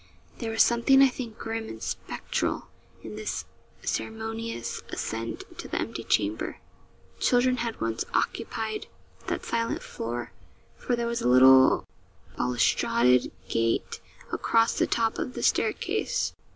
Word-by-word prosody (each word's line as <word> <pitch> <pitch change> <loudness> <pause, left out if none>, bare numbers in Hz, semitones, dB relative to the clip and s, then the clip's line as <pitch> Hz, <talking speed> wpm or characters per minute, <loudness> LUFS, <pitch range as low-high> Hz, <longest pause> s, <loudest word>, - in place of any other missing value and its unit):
There 230 - -3
was 225 0 +5
something 240 +3 +4
I 270 - +6
think 240 -3 -7
grim 225 0 -4
and - - -8
spectral - - -3 0.3
in 210 - -7
this 215 0 -3 0.4
ceremonious 225 - -3
ascent 115 +1 -4 0.2
to - - -5
the - - -2
empty - - -4
chamber. 105 +1 0 0.6
Children 250 +1 +3
had 235 -2 -3
once 115 0 -1
occupied 220 -2 -2 0.4
that - - -2
silent 230 0 -1
floor 120 +1 -5 0.4
for 245 - -1
there 235 0 -2
was 235 0 -1
a 125 - +2
little 130 +1 +7 0.5
balustraded 120 0 +3 0.2
gate 115 0 0 0.3
across 230 0 +2
the - - +2
top 225 -1 +1
of 255 - -4
the - - -4
staircase. - - +1
220 Hz, 130 wpm, -27 LUFS, -, 0.6 s, little